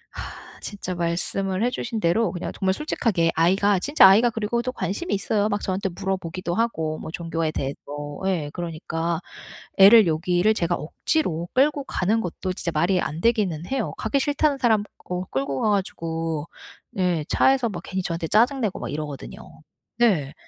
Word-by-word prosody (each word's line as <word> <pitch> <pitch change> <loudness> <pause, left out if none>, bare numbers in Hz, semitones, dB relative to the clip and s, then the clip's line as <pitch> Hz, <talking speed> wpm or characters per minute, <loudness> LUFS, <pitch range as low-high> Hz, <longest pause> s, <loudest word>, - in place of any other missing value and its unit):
아 - - -9
진짜 190 -3 -5
말씀을 185 +3 -1
해 245 - +3
주신 230 -2 -4
대로 210 +5 +2
그냥 175 - -5
정말 190 -1 +1
솔직하게 190 - 0
아이가 190 +4 +3
진짜 285 -4 +6
아이가 220 +5 +6
그리고 225 +1 -1
또 255 +1 -3
관심이 260 - -3
있어요. 205 +1 0
막 205 0 -1
저한테 190 +1 -2
물어보기도 185 -1 -3
하고 160 -9 -1
뭐 160 - -7
종교에 165 -2 -2
대해서. 140 -2 -3 0.5
예 165 -6 -1
그러니까 165 -1 -3 0.6
애를 200 0 +8
여기를 175 +6 +2
제가 175 -4 0
억지로 170 - -1
끌고 285 +2 +2
가는 210 +5 0
것도 185 +1 -4
진짜 175 -2 -3
말이 175 +4 +2
안 160 +1 -3
되기는 200 -9 +1
해요. 265 -4 -2
가기 280 - 0
싫다는 290 0 +1
사람 225 -5 +3
거 180 +1 -5
끌고 135 0 -2
가 215 - +2
가지고 165 -5 -2 0.4
네 180 -5 0
차에서 265 -3 +3
막 175 -4 -6
괜히 190 - -3
저한테 165 -1 -3
짜증 245 - +3
내고 210 -4 -1
막 120 - -5
이러거든요. 150 -2 -6 0.6
네. 170 -13 +2
185 Hz, 355 characters per minute, -24 LUFS, 165-220 Hz, 0.6 s, 애를